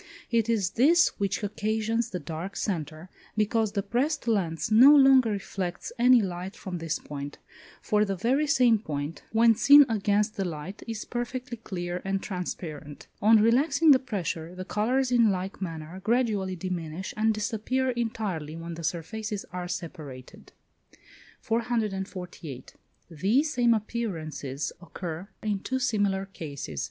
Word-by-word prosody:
It 230 -1 +2
is 205 -5 +1
this 325 +8 +5
which 200 +1 -1
occasions 220 +2 -1
the 185 - -4
dark 165 +5 -6
centre, 160 -4 -3 0.3
because 215 0 +1
the 200 -2 -1
pressed 260 +7 -1
lens 190 -4 0
no 260 +7 +9
longer 265 -4 +6
reflects 195 -3 -4
any 245 -1 +6
light 185 +2 -5
from 185 -5 -6
this 165 -1 -2
point, 145 -1 -7 0.5
for 210 0 +2
the 195 -2 -1
very 260 - +1
same 250 -7 +4
point, 150 -4 -5
when 230 +1 +5
seen 285 +6 +8
against 210 -1 +1
the 195 - 0
light, 170 +2 -6
is 225 -2 -4
perfectly 245 0 -4
clear 180 -4 -5
and 195 0 -2
transparent. 160 -5 -6 0.2
On 220 +1 +6
relaxing 285 +7 +4
the 265 - +7
pressure, 180 - -4
the 185 0 -6
colours, 250 +6 0
in 235 -3 +5
like 190 0 -3
manner, 165 0 -6
gradually 215 -5 +1
diminish, 180 -1 -5
and 220 +1 +2
disappear 225 +5 -1
entirely 215 -10 -3
when 165 +1 -6
the 165 0 -8
surfaces 200 +6 -3
are 180 -1 -4
separated. 150 -8 -8 0.9
448. 195 - -3 0.4
These 225 - +1
same 240 -2 +4
appearances 165 - -4
occur 175 0 -6 0.2
in 210 -2 0
two 260 +6 -2
similar 205 -6 0
cases. 140 - -7
205 Hz, 140 wpm, -27 LUFS, 175-230 Hz, 0.9 s, no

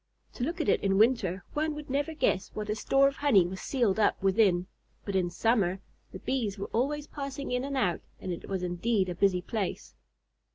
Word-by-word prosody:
To 245 - -4
look 335 +6 -2
at 315 - -1
it - - +3
in 195 -1 +2
winter, 205 -5 +2
one 305 0 -1
would 300 -1 -8
never 290 +4 -1
guess 190 -10 +1
what 210 0 -3
a - - 0
store 270 +5 +3
of 275 - -3
honey 225 -11 +4
was 185 +2 -5
sealed 230 -7 +1
up 210 - +3
within, 190 -2 +3 0.4
but 200 - -3
in 180 -2 +2
summer 195 -2 +1 0.3
the - - -7
Bees 225 -7 -2
were 195 - -6
always 285 +5 0
passing 280 -2 -6
in 250 0 0
and 275 0 -3
out, 190 -9 +1 0.2
and 185 - -5
it 170 - -8
was 190 -2 -2
indeed 185 +2 0
a - - -2
busy 180 0 +2
place. 210 -5 -3
215 Hz, 210 wpm, -29 LUFS, 190-275 Hz, 0.4 s, honey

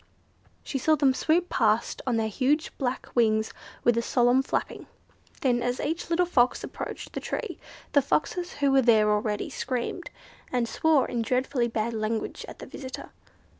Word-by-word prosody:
She 270 - -3
saw 310 +4 +4
them 275 -3 +3
swoop 335 +6 +1
past 220 -5 +1
on 240 -2 +2
their 220 -1 +1
huge 275 +8 0
black 260 -2 -2
wings 220 -2 +2 0.3
with 240 - +4
a 235 - +2
solemn 245 +2 +3
flapping. 270 - -3 0.5
Then, 245 -3 +2
as 245 +1 -1
each 320 +4 -2
little 345 +1 +3
Fox 255 -8 +2
approached - - -6
the - - -3
tree, - - -4 0.3
the 285 - +5
Foxes 350 +6 -1
who 285 -1 +1
were 270 0 +5
there 220 -3 +4
already 210 0 -1
screamed, 255 +7 -3 0.4
and 245 -2 +1
swore 305 +2 +2
in 240 - -2
dreadfully 250 +1 0
bad 230 0 -2
language 220 0 -3
at - - -10
the - - -9
visitor. 260 -2 -8
250 Hz, 170 wpm, -27 LUFS, 230-285 Hz, 0.5 s, the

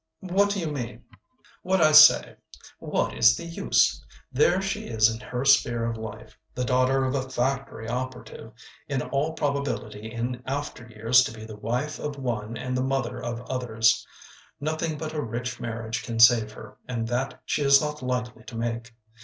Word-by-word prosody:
"What 195 +2 +2
do 200 0 -1
you 170 - -3
mean?" 125 -4 -6 0.6
"What 190 +1 +1
I 155 -2 +5
say. 155 0 +7 0.4
What - - -1
is 115 0 +5
the 170 - -7
use? 170 0 +1 0.3
There 160 +7 +3
she 195 +1 -3
is 110 -1 +3
in 110 - -7
her 125 +3 -4
sphere 120 -4 +4
of 115 - -2
life, 110 -1 -9 0.2
the 125 - -1
daughter 130 +1 +2
of 130 - -1
a 130 -1 -2
factory 130 -3 -2
operative, 125 -2 -6 0.4
in 135 -3 -1
all 145 +3 -1
probability 140 -8 -3
in 120 +2 -4
after 135 -3 -4
years 115 +3 +4
to - - -4
be 110 -1 -10
the 110 -1 -9
wife 125 +8 -3
of 150 -1 -5
one 115 -4 -3
and 125 +3 -3
the 130 - 0
mother 130 -2 -2
of 120 -1 -4
others. 115 -3 +1 0.6
Nothing 155 +1 -2
but 155 +1 -5
a 155 - -2
rich 120 0 -4
marriage 115 -1 -4
can 115 +1 -5
save 115 -2 +6
her, 110 -1 -12
and 115 -2 -3
that 125 +3 -2
she - - -1
is 140 -1 +6
not 150 -1 -4
likely 125 -3 -3
to 115 - -8
make. 115 0 -4
125 Hz, 180 wpm, -26 LUFS, 115-140 Hz, 0.6 s, say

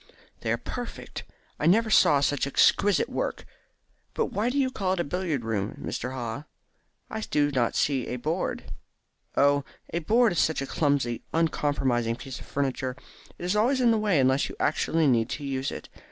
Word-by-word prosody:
"They - - -2
are - - +1
perfect. - - -7 0.3
I 150 - +1
never 220 +5 +4
saw 145 -7 +5
such 145 0 +1
exquisite 205 - +3
work. - - -3 0.7
But 460 - 0
why 215 +4 +1
do 265 - -2
you 265 -2 +2
call 190 -6 -1
it 190 - -3
a - - +2
billiard 160 -4 -2
room, 105 -2 -2
Mr. 125 - -4
Haw? 125 +3 -5 0.7
I 220 - -3
do 145 -1 +2
not 125 -4 0
see 135 -4 +1
any 125 - -3
board." 155 +9 -2 0.7
"Oh, 140 0 +4 0.3
a 170 - +1
board 225 +8 +3
is 175 - 0
such 160 - +2
a 135 - -2
clumsy 140 -5 0
uncompromising 135 -7 +1
piece 130 +1 -8
of - - -12
furniture. 130 -2 -2 0.4
It - - -6
is 180 +3 0
always 245 +6 +3
in 245 -2 +4
the 225 - +2
way 205 -7 +2
unless 130 +1 +2
you - - -8
actually 165 0 +1
need 120 -4 +3
to - - -4
use 135 -1 -2
it. - - -7
145 Hz, 185 wpm, -27 LUFS, 130-190 Hz, 0.7 s, saw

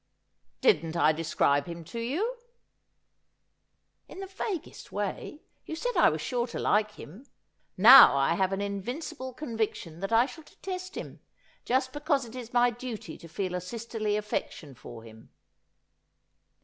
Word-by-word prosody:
' - - -47
Didn't 165 -2 +3
I 155 - +5
describe 150 -2 +1
him 170 -1 -7
to 200 +9 -7
you 360 - -2 0.3
?' - - -50
' - - -48
In - - -10
the 390 - -5
vaguest 385 -2 -6
way. 205 - -4 0.2
You 320 - -4
said - - -3
I - - +6
was - - -3
sure 245 -1 -1
to 235 - -7
like 210 0 +1
him. 210 - -12 0.5
Now 235 - +10
I 135 +3 +2
have 190 +2 0
an 195 +1 -2
invincible 245 - -5
conviction 220 - -4
that 195 +3 -4
I 230 +2 +5
shall 315 +3 -11
detest 370 +3 -7
him; - - -7 0.5
just 260 +1 0
because 290 -3 0
it 235 +1 -12
is 245 -2 -8
my 245 0 +4
duty 235 -8 -7
to 170 - -12
feel 180 +2 -4
a 180 - -2
sisterly 215 +1 -3
affection 205 -8 -4
for 120 -2 -11
him.' 110 0 -15
225 Hz, 160 wpm, -28 LUFS, 180-260 Hz, 0.5 s, Now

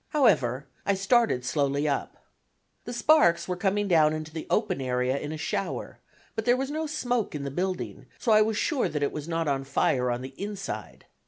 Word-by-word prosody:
However, 140 - +2 0.2
I 200 - +1
started 195 - +2
slowly 140 0 +1
up. 140 - -2 0.7
The - - -5
sparks 235 - +4
were 180 - -1
coming 200 +3 0
down 155 -4 +4
into 155 0 -5
the 160 - -6
open 210 -9 +1
area 125 +1 0
in 150 - -5
a 155 - -4
shower, 155 - -3 0.4
but 220 - -2
there 245 +2 +3
was 270 +2 -2
no 315 +1 -2
smoke 245 - -1
in 145 - -4
the 140 - -4
building, 185 +4 -3
so 235 - 0
I 215 0 +7
was 215 0 +1
sure 275 - +1
that 150 -2 -2
it 140 - +1
was 150 0 -6
not 165 -1 -1
on 135 -1 0
fire 135 -2 +1
on 120 +1 -2
the 130 +1 -8
inside. 200 -1 -6
170 Hz, 200 wpm, -27 LUFS, 140-220 Hz, 0.7 s, I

